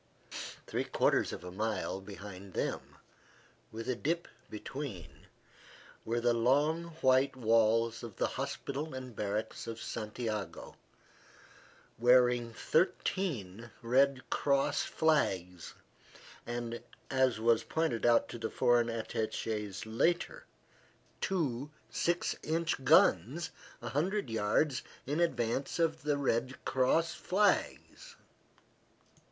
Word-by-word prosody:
Three -, -, -1 dB
quarters -, -, +2 dB
of -, -, -7 dB
a 90 Hz, -, -7 dB
mile 105 Hz, -1 st, -2 dB
behind 100 Hz, -1 st, -9 dB
them, -, -, -3 dB, 0.8 s
with 115 Hz, +1 st, -6 dB
a 130 Hz, -, +1 dB
dip 165 Hz, +7 st, -1 dB, 0.2 s
between, 110 Hz, -, -7 dB, 0.8 s
were 115 Hz, +1 st, 0 dB
the 120 Hz, 0 st, +3 dB
long 145 Hz, +8 st, +2 dB, 0.2 s
white 130 Hz, +1 st, +4 dB
walls 115 Hz, -1 st, +3 dB
of 115 Hz, -4 st, -8 dB
the -, -, +1 dB
hospital 140 Hz, +1 st, -4 dB
and 130 Hz, -3 st, -7 dB
barracks 105 Hz, +2 st, -3 dB
of 115 Hz, 0 st, -5 dB
Santiago, 110 Hz, -2 st, -4 dB, 1.2 s
wearing 120 Hz, -1 st, +4 dB
thirteen 120 Hz, -, -1 dB
Red 130 Hz, +2 st, +3 dB
Cross 140 Hz, -1 st, +2 dB
flags, 95 Hz, -, 0 dB, 0.7 s
and, 120 Hz, -1 st, -4 dB, 0.3 s
as 130 Hz, -4 st, +2 dB
was 115 Hz, 0 st, +3 dB
pointed 160 Hz, -8 st, -1 dB
out 120 Hz, -1 st, +4 dB
to 120 Hz, -, -7 dB
the 115 Hz, -, -2 dB
foreign 120 Hz, -1 st, +3 dB
attaches 110 Hz, -2 st, -3 dB
later, 170 Hz, -, 0 dB, 0.8 s
two 145 Hz, -8 st, -1 dB, 0.2 s
six 175 Hz, +1 st, 0 dB
inch 165 Hz, -3 st, -1 dB
guns 160 Hz, -, +4 dB, 0.3 s
a -, -, -3 dB
hundred 180 Hz, -, -1 dB
yards 115 Hz, +5 st, +1 dB, 0.2 s
in 145 Hz, +4 st, -1 dB
advance 130 Hz, -5 st, 0 dB
of 165 Hz, -5 st, +1 dB
the 145 Hz, 0 st, 0 dB
Red 130 Hz, -1 st, 0 dB
Cross 130 Hz, +6 st, +2 dB
flags. 210 Hz, -, 0 dB
120 Hz, 105 wpm, -32 LUFS, 110-150 Hz, 1.2 s, white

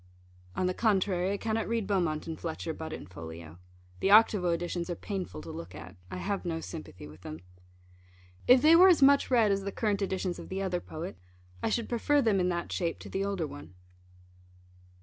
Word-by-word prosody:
On 185 Hz, -, 0 dB
the 185 Hz, -, +1 dB
contrary, 190 Hz, -3 st, +1 dB
I -, -, -1 dB
cannot 225 Hz, +1 st, -1 dB
read 230 Hz, -2 st, -1 dB
Beaumont 175 Hz, -7 st, 0 dB
and 165 Hz, -1 st, -6 dB
Fletcher 165 Hz, 0 st, -4 dB
but 160 Hz, 0 st, -7 dB
in -, -, -7 dB
Folio. 80 Hz, -1 st, -10 dB, 0.4 s
The -, -, +1 dB
Octavo 205 Hz, -3 st, +6 dB
editions 170 Hz, +1 st, -2 dB
are 175 Hz, -, -2 dB
painful 185 Hz, -, -5 dB
to -, -, -7 dB
look 85 Hz, +3 st, -8 dB
at. 90 Hz, +2 st, -10 dB
I 90 Hz, -, -5 dB
have 195 Hz, -, -2 dB
no 165 Hz, -2 st, -2 dB
sympathy 155 Hz, -, -8 dB
with 75 Hz, +3 st, -14 dB
them. 80 Hz, -2 st, -8 dB, 1.1 s
If 250 Hz, +1 st, +7 dB
they 320 Hz, +2 st, +8 dB
were 365 Hz, +3 st, +8 dB
as 330 Hz, -6 st, +5 dB
much 280 Hz, +1 st, +5 dB
read 230 Hz, -5 st, +4 dB
as 195 Hz, 0 st, +1 dB
the 200 Hz, 0 st, -4 dB
current 205 Hz, -1 st, -1 dB
editions 190 Hz, -2 st, -2 dB
of -, -, -9 dB
the 190 Hz, -, -3 dB
other 180 Hz, -2 st, -1 dB
poet, 165 Hz, +4 st, -7 dB, 0.4 s
I -, -, 0 dB
should 230 Hz, +1 st, -1 dB
prefer 285 Hz, +5 st, +2 dB
them 220 Hz, -7 st, +3 dB
in 180 Hz, 0 st, +2 dB
that 170 Hz, -1 st, -3 dB
shape 170 Hz, -2 st, -1 dB
to -, -, -9 dB
the 195 Hz, -, -2 dB
older 195 Hz, -4 st, -1 dB
one. 80 Hz, -, -10 dB
185 Hz, 205 wpm, -30 LUFS, 160-210 Hz, 1.1 s, they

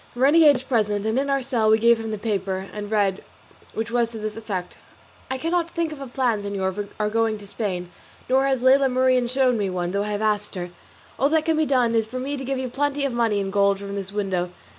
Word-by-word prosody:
The 245 Hz, -, -5 dB
renegade 295 Hz, +2 st, +7 dB
was 255 Hz, -1 st, -4 dB
present, 210 Hz, -6 st, 0 dB
and 220 Hz, +4 st, +1 dB
in 280 Hz, +1 st, -1 dB
our 275 Hz, -1 st, +1 dB
cell 235 Hz, -4 st, +1 dB
we 220 Hz, -, +6 dB
gave 235 Hz, +1 st, +4 dB
him 225 Hz, 0 st, -5 dB
the 215 Hz, -, -3 dB
paper 195 Hz, -3 st, -2 dB
to 210 Hz, -, -5 dB
read, 205 Hz, -2 st, 0 dB, 0.5 s
which 225 Hz, +1 st, -3 dB
was 240 Hz, -1 st, +1 dB
to 225 Hz, -, -6 dB
this 215 Hz, 0 st, -4 dB
effect: 200 Hz, -5 st, -5 dB, 0.5 s
"I 260 Hz, -, -2 dB
cannot 335 Hz, +4 st, 0 dB
think 335 Hz, -2 st, -2 dB
of 300 Hz, -2 st, -8 dB
a 275 Hz, -, -6 dB
plan, 240 Hz, -4 st, 0 dB
señor, 195 Hz, -2 st, -2 dB
for 205 Hz, +1 st, -4 dB
our 210 Hz, -, +1 dB
going 225 Hz, 0 st, 0 dB
to 205 Hz, -, -12 dB
Spain, 190 Hz, -4 st, -4 dB, 0.4 s
nor 265 Hz, +2 st, +3 dB
has 265 Hz, -2 st, 0 dB
Lela 270 Hz, +1 st, +5 dB
Marien 255 Hz, -1 st, +2 dB
shown 255 Hz, -2 st, +2 dB
me 200 Hz, -2 st, 0 dB
one, 180 Hz, -1 st, -2 dB
though 200 Hz, +1 st, 0 dB
I 210 Hz, -, -3 dB
have 205 Hz, -1 st, -2 dB
asked 210 Hz, -1 st, 0 dB
her. 175 Hz, -1 st, -5 dB, 0.5 s
All 275 Hz, -, +3 dB
that 315 Hz, 0 st, +2 dB
can 325 Hz, -1 st, +2 dB
be 310 Hz, -1 st, +1 dB
done 250 Hz, -4 st, +2 dB
is 225 Hz, -1 st, +1 dB
for 250 Hz, +3 st, -6 dB
me 275 Hz, +3 st, -3 dB
to 270 Hz, -, -5 dB
give 270 Hz, +1 st, -2 dB
you 260 Hz, 0 st, -2 dB
plenty 285 Hz, +2 st, -1 dB
of 270 Hz, -, -1 dB
money 230 Hz, -3 st, +1 dB
in 195 Hz, -1 st, -3 dB
gold 200 Hz, 0 st, +3 dB
from 200 Hz, 0 st, -7 dB
this 195 Hz, -1 st, -5 dB
window. 190 Hz, -3 st, -1 dB
225 Hz, 255 wpm, -23 LUFS, 205-265 Hz, 0.5 s, renegade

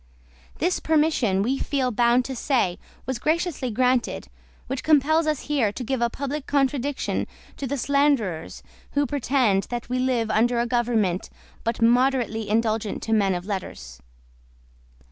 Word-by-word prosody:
This 355 Hz, +3 st, 0 dB
permission, 300 Hz, -11 st, +2 dB
we 265 Hz, +5 st, 0 dB
feel 265 Hz, -3 st, 0 dB
bound 240 Hz, +2 st, +3 dB
to 265 Hz, -, -5 dB
say, 235 Hz, -9 st, 0 dB, 0.3 s
was 260 Hz, -1 st, -3 dB
graciously 315 Hz, -3 st, -1 dB
granted; 250 Hz, +1 st, 0 dB, 0.4 s
which 265 Hz, -1 st, -4 dB
compels 310 Hz, +1 st, +3 dB
us 305 Hz, -3 st, 0 dB
here 270 Hz, -8 st, 0 dB
to 250 Hz, -, -6 dB
give 260 Hz, 0 st, -2 dB
a 235 Hz, -, +2 dB
public 280 Hz, +3 st, -5 dB
contradiction 280 Hz, -1 st, 0 dB, 0.3 s
to 275 Hz, -, -4 dB
the 280 Hz, +3 st, -2 dB
slanderers 275 Hz, -, 0 dB, 0.3 s
who 285 Hz, 0 st, +2 dB
pretend 255 Hz, -8 st, +1 dB
that 240 Hz, -1 st, -5 dB
we 255 Hz, 0 st, 0 dB
live 250 Hz, -3 st, 0 dB
under 235 Hz, +2 st, +2 dB
a 235 Hz, -, +1 dB
government 225 Hz, -6 st, 0 dB, 0.3 s
but 230 Hz, 0 st, -1 dB
moderately 240 Hz, -3 st, +2 dB
indulgent 220 Hz, -1 st, 0 dB
to 225 Hz, -, -1 dB
men 200 Hz, -4 st, +2 dB
of 175 Hz, 0 st, -5 dB
letters. 70 Hz, -, -6 dB
250 Hz, 145 wpm, -24 LUFS, 225-280 Hz, 0.4 s, bound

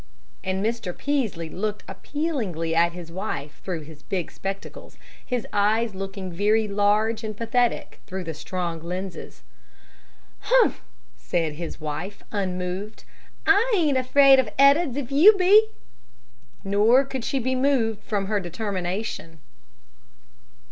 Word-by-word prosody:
And 190 Hz, +2 st, -1 dB
Mr. 225 Hz, -6 st, -3 dB
Peaslee 230 Hz, -, -1 dB
looked 210 Hz, +5 st, -3 dB
appealingly 225 Hz, -, -3 dB
at 170 Hz, +1 st, +3 dB
his 170 Hz, -2 st, -9 dB
wife 145 Hz, -5 st, -5 dB
through 175 Hz, -4 st, -3 dB
his 150 Hz, 0 st, -13 dB
big 180 Hz, +2 st, -3 dB
spectacles, 195 Hz, 0 st, -7 dB, 0.3 s
his 250 Hz, -3 st, -3 dB
eyes 215 Hz, +2 st, +2 dB
looking 195 Hz, -1 st, -6 dB
very 210 Hz, +4 st, +2 dB
large 210 Hz, +2 st, +1 dB
and 215 Hz, -2 st, -5 dB
pathetic 235 Hz, +1 st, 0 dB
through 190 Hz, 0 st, -5 dB
the 165 Hz, -2 st, -5 dB
strong 170 Hz, +1 st, -4 dB
lenses. 180 Hz, +1 st, -6 dB, 1.0 s
"Humph!" -, -, +3 dB, 0.4 s
said 165 Hz, -3 st, -1 dB
his 165 Hz, +1 st, -7 dB
wife, 155 Hz, +6 st, -5 dB
unmoved. 185 Hz, +1 st, -3 dB, 0.4 s
"I 415 Hz, +5 st, +4 dB
ain't 305 Hz, -6 st, +2 dB
afraid 270 Hz, +1 st, +6 dB
of 250 Hz, -5 st, +1 dB
Ed'ards, 280 Hz, 0 st, +4 dB
if 275 Hz, -2 st, -4 dB
you 375 Hz, +10 st, +7 dB
be." 405 Hz, +4 st, +6 dB, 1.0 s
Nor 215 Hz, +7 st, +4 dB
could 265 Hz, -2 st, -5 dB
she 275 Hz, -, -1 dB
be 260 Hz, 0 st, 0 dB
moved 255 Hz, -5 st, +1 dB
from 205 Hz, -3 st, -2 dB
her 205 Hz, +1 st, 0 dB
determination. 185 Hz, -2 st, -4 dB
205 Hz, 125 wpm, -24 LUFS, 180-255 Hz, 1.0 s, you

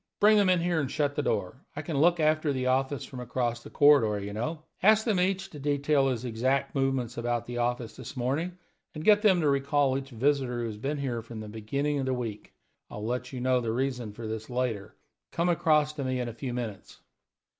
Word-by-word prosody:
Bring 210 Hz, +1 st, +6 dB
them 200 Hz, -2 st, +4 dB
in 180 Hz, -2 st, +3 dB
here 170 Hz, -1 st, +1 dB
and 135 Hz, -, -2 dB
shut 145 Hz, 0 st, 0 dB
the 150 Hz, -, -1 dB
door; 100 Hz, -2 st, -2 dB
I 145 Hz, -, -4 dB
can 155 Hz, +1 st, -4 dB
look 170 Hz, +4 st, +4 dB
after 155 Hz, -1 st, +2 dB
the 130 Hz, -2 st, -2 dB
office 135 Hz, +2 st, 0 dB
from 130 Hz, -, -9 dB
across 120 Hz, -1 st, -2 dB
the -, -, -11 dB
corridor, 130 Hz, -8 st, +5 dB
you 100 Hz, +1 st, -6 dB
know. 155 Hz, +9 st, -3 dB, 0.2 s
Ask 215 Hz, +2 st, +5 dB
them 215 Hz, -6 st, +2 dB
each 190 Hz, +1 st, 0 dB
to 150 Hz, -, -9 dB
detail 145 Hz, 0 st, +2 dB
his 130 Hz, -2 st, -2 dB
exact 125 Hz, +4 st, 0 dB
movements 135 Hz, -3 st, -1 dB
about 120 Hz, 0 st, -1 dB
the 120 Hz, 0 st, -5 dB
office 120 Hz, -1 st, -1 dB
this 130 Hz, +1 st, -9 dB
morning, 150 Hz, +9 st, -1 dB, 0.4 s
and 155 Hz, -, -5 dB
get 210 Hz, -1 st, +6 dB
them 190 Hz, -5 st, +4 dB
to 155 Hz, -, +2 dB
recall 140 Hz, -1 st, +2 dB
each 135 Hz, 0 st, -4 dB
visitor 130 Hz, 0 st, 0 dB
who -, -, -2 dB
has 110 Hz, -2 st, -5 dB
been 140 Hz, +6 st, -2 dB
here 125 Hz, -4 st, -2 dB
from 115 Hz, 0 st, -9 dB
the 110 Hz, -, -7 dB
beginning 140 Hz, +8 st, -2 dB
of 135 Hz, -, -2 dB
the 130 Hz, -, +1 dB
week. 115 Hz, -4 st, -5 dB, 0.4 s
I'll 105 Hz, -, -6 dB
let 125 Hz, +2 st, -3 dB
you 130 Hz, -2 st, -5 dB
know 130 Hz, 0 st, +2 dB
the 115 Hz, -2 st, -2 dB
reason 125 Hz, -1 st, -2 dB
of 105 Hz, -, -12 dB
this 110 Hz, -1 st, -5 dB
later. 120 Hz, -5 st, -2 dB, 0.4 s
Come 170 Hz, +1 st, 0 dB
across 150 Hz, -3 st, +3 dB
to 145 Hz, -2 st, -4 dB
me 130 Hz, -1 st, -1 dB
in 125 Hz, -, -2 dB
a 120 Hz, -, -5 dB
few 125 Hz, +3 st, -5 dB
minutes." 115 Hz, -5 st, -6 dB
130 Hz, 230 wpm, -28 LUFS, 120-150 Hz, 0.4 s, Bring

